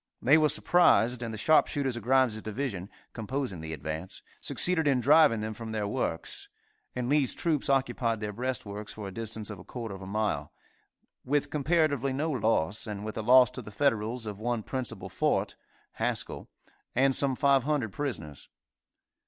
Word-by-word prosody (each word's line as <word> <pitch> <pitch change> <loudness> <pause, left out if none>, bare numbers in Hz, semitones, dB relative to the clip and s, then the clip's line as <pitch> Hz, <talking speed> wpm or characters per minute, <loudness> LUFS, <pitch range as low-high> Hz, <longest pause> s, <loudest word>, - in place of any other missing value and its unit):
They 135 +5 +5
were 155 -1 +4
surprised, 125 - +4
and 115 -2 -3
the 110 - -6
sharpshooters 140 0 +2
of 120 - -5
Grimes' 125 -3 +2
division, 105 -4 -4 0.2
composing 115 - -4
the 80 0 -6
advance, 80 +4 -5 0.2
succeeded 175 -4 0
in 135 -3 +3
driving 135 -3 +5
them 110 0 -3
from 110 0 -7
their 105 -2 -1
works, 100 -8 -2 0.5
and 125 -1 -2
Lee's 140 -1 +2
troops 155 -5 0
occupied 120 -4 +1
their 105 -1 -4
breastworks 105 -3 -4
for 105 -2 -7
a - - -6
distance 110 -1 -5
of 100 - -8
a - - -11
quarter 115 -2 -6
of 95 - -9
a 95 - -8
mile, 100 -8 -1 0.7
with 145 +1 0
comparatively 150 -3 +1
no 155 +4 -1
loss, 110 - 0
and 105 -1 -5
with 110 - -5
a - - -2
loss 125 +1 +6
to - - -6
the - - -10
Federals 115 -1 0
of 105 -2 -6
one 120 0 -1
principal 130 -1 -4
fort - - 0 0.4
(Haskell) - - -3 0.5
and 135 +1 +3
some 135 -2 +1
500 140 -3 +2
prisoners. 80 - -5
120 Hz, 170 wpm, -29 LUFS, 105-135 Hz, 0.7 s, loss